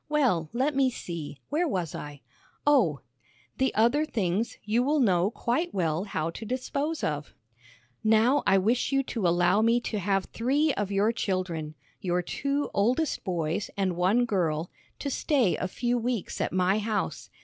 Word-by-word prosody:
"Well, 240 - +2
let 265 +5 0
me 270 -1 +4
see, 170 - -6
where 330 +4 +1
was 180 - -2
I? 145 -1 -7 0.4
Oh, 240 - +3 0.6
'The 265 0 +2
other 235 +8 +3
things 215 - -1
you 220 +3 +1
will 295 +4 +2
know 190 -6 +3
quite 255 +8 -2
well 170 0 0
how 165 -5 -2
to 195 - -8
dispose 280 +6 -2
of. 150 0 -3 0.7
"'Now 225 +6 +4
I 195 - +5
wish 230 +8 +1
you 275 0 +2
to 225 -7 -1
allow 175 +4 +3
me 230 +2 +4
to 215 -3 -3
have 195 0 0
three 280 +6 +1
of 205 -1 -2
your 200 +3 +3
children 180 -8 -2 0.2
your 180 -1 0
two 280 +9 -2
oldest 250 +9 +1
boys 175 +2 -2
and 190 -3 0
one 195 +8 +3
girl 170 -6 -1 0.3
to 280 - -3
stay 260 - +2
a 185 - -2
few 240 +5 -1
weeks 235 -3 -2
at - - 0
my 185 +3 +2
house. 215 0 -2
215 Hz, 165 wpm, -27 LUFS, 180-255 Hz, 0.7 s, I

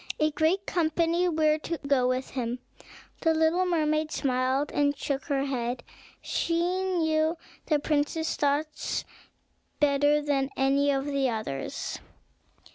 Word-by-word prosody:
A 305 0 +3
great 320 +6 +1
company 335 +1 +1
were 310 -1 +2
to 335 +2 -3
go 270 -3 +3
with 255 +1 -1
him. 245 -2 -2 0.6
The 325 -1 +3
little 325 +3 +2
mermaid 310 -2 +1
smiled, 260 +1 0
and 285 0 +1
shook 275 -1 -2
her 275 -3 0
head. 245 -2 -2 0.4
She 335 - -1 0.3
knew 320 -3 +1 0.3
the 305 - +3
prince's 300 +2 0
thoughts 295 +1 -1 0.7
better 290 0 +3
than 275 -2 0
any 275 +1 +3
of 275 -1 +1
the 280 -2 +1
others. 215 - -4
295 Hz, 125 wpm, -28 LUFS, 270-320 Hz, 0.7 s, A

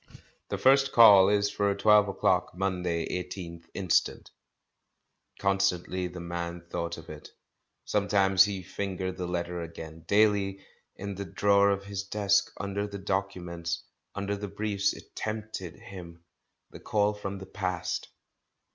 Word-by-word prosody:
"The - - -2
first 135 +1 +4
Call 100 -5 +8
is 100 0 +2
for 100 -1 +1
twelve 105 0 +5
o'clock, 95 -2 +1
Monday, 90 -3 -1 0.2
18th 85 -2 -8
instant." 95 -4 0 1.1
Constantly 95 -2 0
the 90 0 -8
man 85 0 -5
thought 85 -1 -3
of 80 - -11
it, 75 -1 -10 0.6
sometimes 95 -2 +4
he 100 -3 -4
fingered 95 0 -4
the 90 - -3
letter 85 0 -3
again; 80 -1 -9
daily, 100 -1 +2 0.3
in 100 +1 -5
the 100 +1 -5
drawer 100 +3 +3
of 100 0 0
his 100 -1 -4
desk, 100 0 +1
under 100 0 -3
the 100 0 -7
documents, 90 -4 -3 0.3
under 100 0 -2
the 105 +1 -5
briefs, 100 0 0
it - - -14
tempted 105 -5 -5
him 85 -3 -11 0.2
— - - -53
the - - -10
Call 105 0 +1
from 100 -1 -5
the 95 - -8
past. 90 -2 -3
95 Hz, 140 wpm, -28 LUFS, 90-100 Hz, 1.1 s, Call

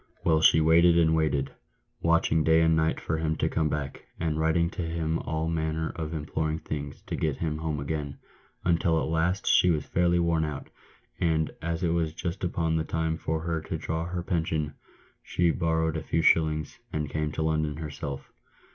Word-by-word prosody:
Well, 80 -1 +3
she 80 - +6
waited 85 +2 +5
and 80 -1 +4
waited, 70 -4 0 0.5
watching 80 -1 +3
day 80 +1 +4
and 80 0 +4
night 80 0 +1
for 80 0 -2
him 80 0 0
to - - 0
come 80 -1 0
back, 70 -2 -4 0.2
and 80 -2 -1
writing 85 +2 +2
to - - -5
him 80 -1 -1
all 80 0 -2
manner 80 0 -1
of 80 -2 -4
imploring 80 0 -2
things 75 -2 -6
to - - -4
get 75 -3 -1
him 75 -2 -2
home 80 -2 -2
again, 70 0 -4 0.5
until 85 -1 +2
at - - -1
last 85 +4 0
she 90 - +5
was 75 -4 +1
fairly 85 0 +2
worn 85 -2 +2
out; 75 -3 -5 0.5
and, 80 -2 +1
as 85 +2 -2
it 85 - +2
was 80 -2 0
just 90 +1 -4
upon 85 -2 0
the 80 - 0
time 80 0 -1
for 80 0 -2
her 80 -1 -2
to 80 +1 -4
draw 80 +1 -3
her 85 0 -4
pension, 80 -4 -1 0.5
she 85 -1 +1
borrowed 80 -1 0
a 80 - -2
few 80 +2 -1
shillings, 80 -2 +2
and 75 -1 -3
came 75 -1 -1
to 80 - -1
London 80 -1 0
herself." 70 -3 -6
80 Hz, 190 wpm, -27 LUFS, 80-85 Hz, 0.5 s, she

